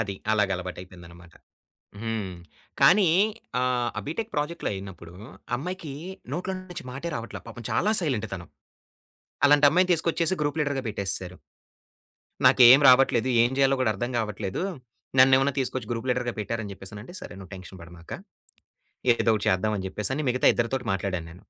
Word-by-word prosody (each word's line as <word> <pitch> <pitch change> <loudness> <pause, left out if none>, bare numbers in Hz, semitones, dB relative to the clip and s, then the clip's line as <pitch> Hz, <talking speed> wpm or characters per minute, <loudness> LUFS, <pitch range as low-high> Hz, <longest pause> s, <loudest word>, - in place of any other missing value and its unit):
అది. 100 -3 -3 0.2
అలాగ 105 -2 +2
అలవాటయిపోయిందన్నమాట. 90 -1 -10 0.7
హ్మ్. 110 -5 -3 0.5
కానీ 195 -2 +6 0.5
ఆహ్, 125 -1 0 0.2
బీటెక్ 180 +9 -4
ప్రాజెక్ట్‌లో 150 +3 -2
అయినప్పుడు 95 -3 -9 0.4
అమ్మాయికి 170 0 -6 0.4
నోట్లో 185 +2 -3
నుంచి 175 -2 -9
మాటే 140 +7 -5
రావట్లే 115 0 -7
పాపం 115 +1 -9
చాలా 210 - +1
సైలెంట్ 125 - -1
తను. 90 -2 -6 1.0
అలాంటి 145 0 +6
అమ్మాయిని 180 +4 +2
తీసుకొచ్చేసి 170 +2 +1
గ్రూప్ 145 +1 -1
లీడర్‌గా 145 -3 -1
బెట్టేసేసారు. 95 -3 -4 1.1
"నాకేం 130 +3 +8
రావట్లేదు 130 -1 +4
ఏం 120 - +1
జేయాలో 135 0 +3
గూడా 110 - +2
అర్థం 120 +5 -3
గావట్లేదు. 105 - -3 0.6
నన్నేమన్నా 135 +1 +5
తీసుకొచ్చి 130 -3 -3
గ్రూప్ 115 +2 -4
లీడర్‌గా 125 -1 -2
పెట్టరు" 110 +2 -3
అని 100 - -7
జెప్పేసనంటే, 105 - -10
సరే, - - -9
నువ్వు 95 0 -12
టెన్షన్ 95 0 -11
బడమాక. 85 0 -14 1.0
ఏదో 115 - 0
ఒకటి 105 - -3
చేద్దామని 95 +1 0
జెప్పేసని 105 +10 -3
మిగతా 125 +1 +3
ఇద్దరితోటి 120 +1 -2
మాట్లాడాను 95 -4 -3
నేను. 90 - -14
120 Hz, 140 wpm, -26 LUFS, 95-140 Hz, 1.1 s, నాకేం